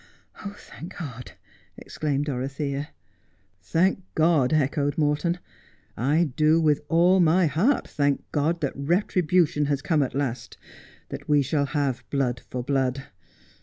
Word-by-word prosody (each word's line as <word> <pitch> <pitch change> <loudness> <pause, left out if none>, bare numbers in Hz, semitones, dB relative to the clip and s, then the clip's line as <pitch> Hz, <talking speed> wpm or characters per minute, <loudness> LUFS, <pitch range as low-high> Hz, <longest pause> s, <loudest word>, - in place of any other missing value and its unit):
' - - -37 0.4
Thank 175 +4 -9
God,' 125 -7 -7 0.4
exclaimed 145 -2 -2
Dorothea. 140 +1 -3 0.4
' 95 +3 -41
Thank 190 +3 +3
God,' 155 -5 +3
echoed 145 -1 +1
Morton. 155 +3 +1 0.4
' - - -37
I 150 +5 +1
do 155 +1 +4
with 150 -3 +2
all 175 +3 +4
my 175 +1 +4
heart 190 - +1
thank 140 -2 0
God 160 +4 0
that 140 - -1
retribution 170 0 +1
has 140 -1 -1
come 155 -1 +2
at 135 -2 -2
last; 135 -4 -3 0.5
that - - -8
we 145 -1 +4
shall 140 +1 0
have 140 -5 -1
blood 125 -4 -1
for 125 -1 -4
blood. 135 0 0
145 Hz, 140 wpm, -25 LUFS, 135-165 Hz, 0.5 s, do